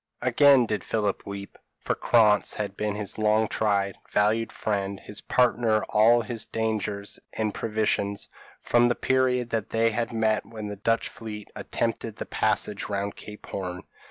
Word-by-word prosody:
p> - - 0
Again 140 -4 +6
did 105 -4 -2
Philip 105 -3 -1
weep, 100 0 -7 0.2
for - - -1
Krantz 105 -4 +3
had 100 -2 -3
been 105 0 -2
his 105 0 -3
long 110 +1 +3
tried, 100 -3 0
valued 110 +2 +2
friend, 100 -2 -2
his 105 - -7
partner 120 -3 +2
in - - -2
all 115 +2 +5
his 115 0 -4
dangers 105 -2 -2
and 110 -2 -1
privations, 105 -2 -1 0.4
from 120 0 +4
the 120 - +1
period 125 -2 +1
that 115 -1 -1
they 115 0 +2
had 115 +2 -2
met 110 -2 +1
when 110 -2 -7
the 105 - -5
Dutch 115 +3 0
fleet 105 -2 -8
attempted - - -2
the - - -5
passage 105 -1 -1
round 100 0 -2
Cape 105 0 -11
Horn. 90 -1 -5
110 Hz, 165 wpm, -26 LUFS, 100-115 Hz, 0.4 s, Again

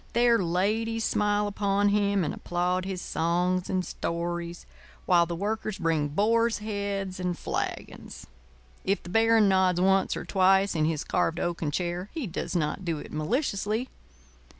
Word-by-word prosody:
There 235 0 +4
ladies 215 +6 0
smile 210 -1 +1
upon 205 0 +1
him 200 -2 +2
and 150 - -2
applaud 180 +1 -1
his 190 -2 -4
songs 175 +2 0
and 185 -1 0
stories, 170 0 -4 0.4
while 170 -2 +4
the 170 - -3
Workers 215 +2 -2
bring 165 -4 +1
boars' 225 +8 +2
heads 200 -3 -3
and 180 -1 -2
flagons. - - -5 0.6
If 195 +2 0
the - - -9
Baron 225 +1 +4
nods 190 -2 +3
once 190 +1 +2
or - - -6
twice 190 0 +3
in 155 -2 +1
his 155 -2 -1
carved 165 +1 0
oaken 170 -3 -2
chair, 175 +4 -3
he 310 -6 -2
does 180 -1 -4
not 160 +3 -1
do 165 -3 -1
it - - -9
maliciously. 215 - -1
190 Hz, 150 wpm, -27 LUFS, 175-210 Hz, 0.6 s, There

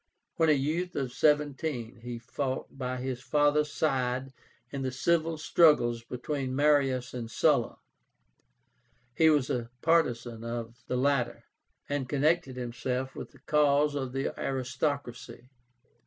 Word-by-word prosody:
When 165 -1 +3
a - - +7
youth 160 +6 -1
of 130 -3 -2
seventeen 145 -5 0
he 120 0 -5
fought 130 +3 -4
by 130 -1 -3
his 125 -1 -4
father's 150 +1 +2
side 130 -3 -1 0.4
in 140 - -4
the 130 - -1
civil 165 +4 +1
struggles 150 -8 +4
between 130 +2 -3
Marius 135 -3 +2
and 120 -2 -5
Sulla. 140 -1 +2 1.4
He 160 +4 +5
was 145 -4 +2
a 120 -2 -2
partisan 120 -8 +1
of 115 0 -5
the 125 - -1
latter, 135 -1 0 0.4
and 140 -3 -2
connected 145 -1 +1
himself 125 +1 -3
with - - -7
the 140 - -21
cause 150 0 +3
of 135 -3 -3
the 135 +1 -2
aristocracy. 130 -2 -3
135 Hz, 130 wpm, -29 LUFS, 125-150 Hz, 1.4 s, a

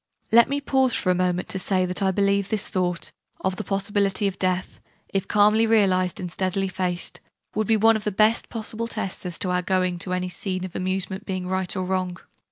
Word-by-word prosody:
Let 235 +1 +6
me 280 +1 0
pause 265 -3 +2
for 185 - +2
a - - +4
moment 180 0 0
to 190 - 0
say 185 0 +2
that 180 +1 -1
I 195 - +3
believe 200 0 +1
this 215 -2 -1
thought, 180 -2 -1 0.3
of 190 -1 -1
the - - -3
possibility 200 0 0
of 195 -1 -4
death 185 0 -1 0.3
if 195 -1 -2
calmly 210 +2 +4
realised, 190 -5 +2
and 180 -2 -5
steadily 190 +2 -1
faced 180 -1 -2 0.3
would 215 -1 -1
be 225 - +4
one 225 +1 +5
of 215 - -3
the 210 - -1
best 215 +4 +3
possible 225 0 -4
tests 195 -5 -3
as 175 - -5
to 185 - -1
our 180 0 +1
going 185 -1 0
to 180 +2 -3
any 185 0 -1
scene 185 0 -3
of 185 - -9
amusement 190 +2 -2
being 185 -2 -3
right 185 0 -1
or 185 -1 -2
wrong. 185 -1 -1
190 Hz, 215 wpm, -24 LUFS, 185-210 Hz, 0.3 s, Let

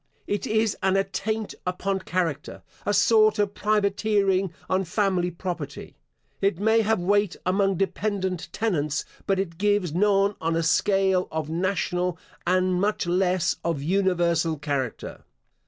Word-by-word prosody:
It 205 - -2
is 220 -1 +1
an 190 0 +2
attaint 200 +2 -2
upon 190 +2 -2
character; 175 -6 -3 0.2
a - - +3
sort 215 +1 +4
of 205 -1 0
privateering 200 -2 +1 0.2
on 190 +1 +1
family 185 -1 0
property. 170 -5 -6 0.5
It 195 -3 +1
may 220 +2 +3
have 220 -1 +1
weight 205 +1 +1
among 195 0 +2
dependent 190 -2 -2
tenants, 150 -10 -1 0.2
but 195 - +2
it 175 -3 -3
gives 205 -5 +1
none 200 +2 +3
on 165 0 0
a 165 - +1
scale 190 +2 +2
of 155 -1 -3
national, 180 0 -1 0.3
and 185 0 +2
much 205 -1 0
less 180 0 +1
of 165 -4 -1
universal 170 -3 +1
character. 140 -5 -4
190 Hz, 135 wpm, -25 LUFS, 175-205 Hz, 0.5 s, sort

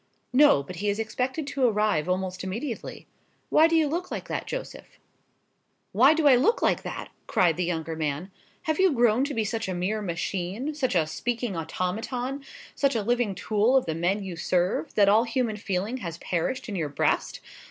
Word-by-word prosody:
"No; 280 - +6
but 175 +5 -9
he 205 +3 -1
is 205 - 0
expected 250 +7 -2
to 275 -1 -2
arrive 210 -7 +1
almost 185 0 -2
immediately. 225 +6 -5 0.5
Why 315 - +6
do 330 - +1
you 320 -1 +4
look 345 +5 -3
like - - -5
that, - - -3
Joseph?" - - -7 0.9
"Why 265 +10 +5
do 320 -1 0
I 275 -3 +8
look 455 - +3
like - - +2
that?" - - -6 0.2
cried 170 -3 +3
the 180 - -1
younger 165 -2 -3
man; 155 +4 -3 0.3
"have 315 -1 -1
you 380 -1 +5
grown 240 0 +3
to 285 - -4
be 225 - +1
such 225 +1 -2
a 185 - -2
mere 200 +5 -1
machine, 190 - -3
such 265 -8 -1
a 165 -3 +3
speaking 235 +5 -3
automaton, 225 - -3 0.3
such 275 -2 +1
a 220 - 0
living 240 -3 0
tool 220 +7 +2
of 260 - +1
the 160 - -2
men 180 +5 0
you 185 -3 -6
serve, 175 -1 0
that 200 -1 +5
all 215 +3 +5
human 235 -2 -1
feeling 205 +3 -2
has 170 -8 -6
perished 180 +12 -2
in 210 - -4
your 160 -5 -2
breast? 145 - 0
215 Hz, 195 wpm, -26 LUFS, 180-255 Hz, 0.9 s, I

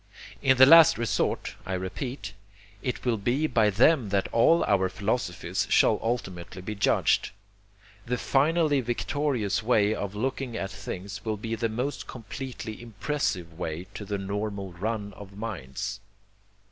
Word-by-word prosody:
In 130 -1 +4
the 130 - +10
last 165 +2 +8
resort, 115 0 -1
I 95 - -4
repeat, 100 +4 -5 0.5
it 125 0 -3
will 120 -3 +2
be 120 +9 0
by 115 -7 +3
them 120 +3 +4
that 100 -1 +1
all 165 +9 +4
our 95 -2 +2
philosophies 95 -4 -2
shall - - +4
ultimately 95 -6 -4
be 105 - -4
judged. 100 - +2 0.8
The 125 +1 0
finally 145 +2 +2
victorious 120 -3 -1
way 110 -2 +3
of 100 -2 -4
looking 130 +1 -2
at 95 0 -3
things 100 0 -7
will 110 -2 -2
be 115 +2 -4
the 115 0 -1
most 125 +6 -3
completely 115 -1 -7
IMPRESSIVE 110 - -2
way 80 +1 -4
to - - -6
the 100 0 -3
normal 100 -1 -4
run 105 +2 -3
of 100 -1 -12
minds. 100 - -5
110 Hz, 145 wpm, -27 LUFS, 100-125 Hz, 0.8 s, the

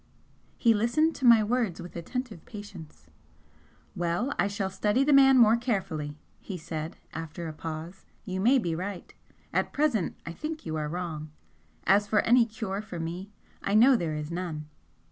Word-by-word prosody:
He 230 -2 +4
listened 240 +10 +2
to 265 - -2
my 230 -2 +8
words 225 -4 0
with 175 0 -9
attentive 215 +2 -5
patience. 175 - -11 0.8
"Well, 175 +10 -1
I - - +3
shall 200 -1 -2
study 210 +6 +2
the 290 +1 +3
man 270 -1 +7
more 230 -2 +7
carefully," 190 - -2 0.2
he 190 - -6
said, 155 0 -5 0.2
after 165 +1 -6
a 155 - -5
pause; 160 +4 -7 0.2
"You 185 -1 -3
may 245 +8 +5
be 175 -9 -1
right. 185 +3 -5 0.4
At - - 0
present 280 - +1
I 165 - -5
think 310 - -6
you 160 -1 -3
are 150 -1 -2
wrong. 160 -3 -4 0.5
As 205 +1 +4
for 210 0 +3
any 235 0 +4
cure 210 -3 -4
for 190 -5 -7
me, 175 +4 -5 0.3
I 200 - 0
know 250 +5 +7
there 165 -8 -1
is 150 +1 -5
none. 170 -3 -4
195 Hz, 170 wpm, -28 LUFS, 165-235 Hz, 0.8 s, my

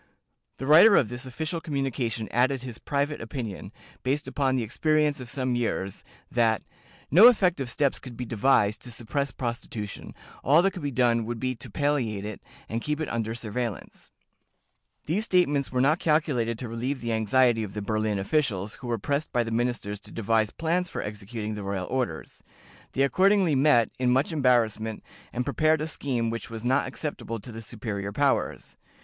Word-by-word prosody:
The 135 - -5
writer 170 +9 +8
of 110 - +3
this 125 +2 -6
official 160 +6 -3
communication 130 -7 -2
added 130 +2 +2
his 120 -3 -7
private 145 +1 -1
opinion, 115 -3 -6 0.3
based 140 +4 -1
upon 135 -2 0
the 125 - 0
experience 150 +5 +1
of 125 -2 -8
some 130 +1 -1
years, 100 -5 -2 0.3
that 115 -2 +2 0.5
"no 195 +10 +10
effective 180 - +3
steps 140 +2 0
could 120 -3 -10
be 125 - -4
devised 110 -2 +2
to 125 - -8
suppress 135 +4 -2
prostitution: 115 -4 -5 0.3
all 155 +5 +5
that 195 - +3
could 185 - -8
be 145 - -1
done 120 -3 +2
would 120 0 -4
be 130 +1 -1
to 115 - -11
palliate 130 -9 -1
it, 105 -1 -6 0.3
and 115 +2 -3
keep 150 +3 -2
it 155 - -2
under 115 -1 -2
surveillance." 115 -2 -5 1.0
These 195 +8 0
statements 145 -8 +2
were 125 0 +1
not 150 +5 +3
calculated 140 -8 +1
to 120 - -5
relieve 125 +4 -3
the 115 -1 -1
anxiety 115 +2 +3
of 105 -2 -6
the 105 - -3
Berlin 110 0 0
officials, 105 -2 -1
who 125 - -6
were 120 -1 0
pressed 140 +8 -2
by 120 -2 +2
the 115 - -5
ministers 115 -3 -1
to - - -12
devise 110 -1 +1
plans 170 +5 -1
for - - -4
executing 105 +1 -5
the 105 - -5
royal 100 -2 -3
orders. 130 +2 -3 0.5
They 135 - +2
accordingly 190 +3 +3
met, 130 -5 +4
in 125 -1 +2
much 130 +6 +2
embarrassment, 115 -6 +1 0.3
and 125 +1 -2
prepared 155 +3 +2
a 155 - -1
scheme 125 -7 -2
which 115 - -5
was 115 0 -7
not 130 +3 +2
acceptable 130 -4 -5
to 120 - -9
the 115 0 -7
superior 105 -3 -5
powers. 140 +5 0
125 Hz, 180 wpm, -27 LUFS, 115-145 Hz, 1.0 s, no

